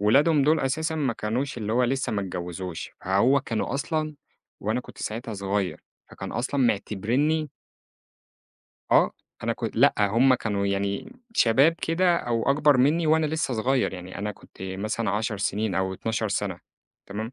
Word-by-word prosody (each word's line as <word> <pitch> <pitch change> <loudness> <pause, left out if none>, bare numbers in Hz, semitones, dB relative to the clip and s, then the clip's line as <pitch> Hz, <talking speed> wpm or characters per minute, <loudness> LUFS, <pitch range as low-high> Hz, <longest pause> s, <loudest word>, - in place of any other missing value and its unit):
ولادهم 140 +8 +4
دول 155 +3 +4
أساسًا 160 +5 -1
ما 140 -6 0
كانوش 120 +5 -2
اللي 110 -1 -2
هو 125 +2 +3
لسه 135 0 -1
ما 105 - 0
اتجوزوش، 90 -1 -5
فهو 115 +9 +3
كانوا 115 +2 -2
أصلًا 155 +1 -2 0.5
وأنا 110 +5 0
كنت - - -14
ساعتها 110 0 -4
صغير 100 -1 -2 0.3
فكان - - -7
أصلًا 125 +5 -1
معتبرِينّي 125 +7 +1 1.4
آه. - - +5 0.3
أنا - - +1
كن - - -3
لأ. - - +5
هم 115 +6 +4
كانوا 100 -4 -1
يعني 100 - -2 0.2
شباب 135 +8 +5
كده 170 +1 +1
أو 120 -7 -1
أكبر 145 0 +4
منّي 150 +6 +3
وأنا 155 0 +4
لسّه 155 -4 -1
صغير. 125 +4 +1
يعني 90 0 -8
أنا 105 +1 -3
كنت - - -20
مثلًا 100 +3 -2
10 105 +1 -1
سنين 100 +1 -1
أو 95 0 0
12 110 +2 -2
سنة 100 -2 -2 0.5
تمام؟ 110 +4 -5
115 Hz, 155 wpm, -26 LUFS, 100-140 Hz, 1.4 s, آه